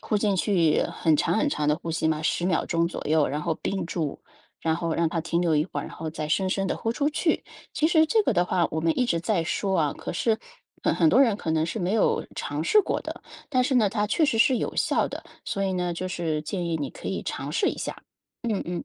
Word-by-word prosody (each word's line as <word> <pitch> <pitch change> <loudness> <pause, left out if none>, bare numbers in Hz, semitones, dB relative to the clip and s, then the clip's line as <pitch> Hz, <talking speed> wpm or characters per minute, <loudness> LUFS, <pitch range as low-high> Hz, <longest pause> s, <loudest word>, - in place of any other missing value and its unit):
呼 215 - -1
进 205 -1 +1
去 175 -6 +3
很 160 - +1
长 - - +1
很 295 - +2
长 150 - 0
的 150 - +3
呼 170 0 -6
吸 160 0 0
嘛， 155 -1 0
10 175 +2 0
秒 180 -3 +1
钟 165 0 +1
左 - - -6
右， 155 -1 +4
然 150 +2 -3
后 160 - 0
屏 195 - -2
住， 160 -5 -3 0.4
然 160 -1 +2
后 165 -1 -2
让 170 - +2
它 165 - -1
停 170 +2 0
留 165 -3 +2
一 150 - +2
会 145 - -4
儿， - - -7
然 - - -10
后 160 - -5
再 155 -1 -4
深 190 +5 +1
深 195 +1 0
地 - - -1
呼 225 - -1
出 285 +4 0
去。 320 +3 0 0.3
其 310 - +2
实 320 -1 +4
这 435 +7 +3
个 335 - +1
的 175 -3 +2
话 180 -2 +2
我 160 - -2
们 165 0 +1
一 250 - +3
直 170 -9 0
在 180 -2 0
说 190 +2 0
啊， 150 -3 +1
可 - - -5
是 220 +4 +1 0.4
很 - - +2
很 320 - +4
多 260 - +5
人 230 -7 +4
可 165 - -4
能 160 0 +2
是 195 - -3
没 185 0 -1
有 220 - +2
尝 145 +2 -3
试 425 - +5
过 - - -2
的。 - - -7 0.3
但 255 -4 +2
是 265 0 0
呢， 220 -4 +4
它 210 +1 0
确 310 +9 +2
实 235 -6 +1
是 260 +2 +5
有 - - -3
效 - - +2
的， - - -7 0.2
所 195 - -2
以 190 - 0
呢 180 -1 -1
就 185 +2 -4
是 160 -4 -2
建 175 +2 -3
议 165 -1 0
你 145 -4 -3
可 - - -10
以 - - -2
尝 - - -4
试 - - +1
一 - - -3
下。 - - -4 0.5
嗯 210 -3 0
嗯， 175 -1 -4
175 Hz, 290 characters per minute, -26 LUFS, 160-215 Hz, 0.5 s, 多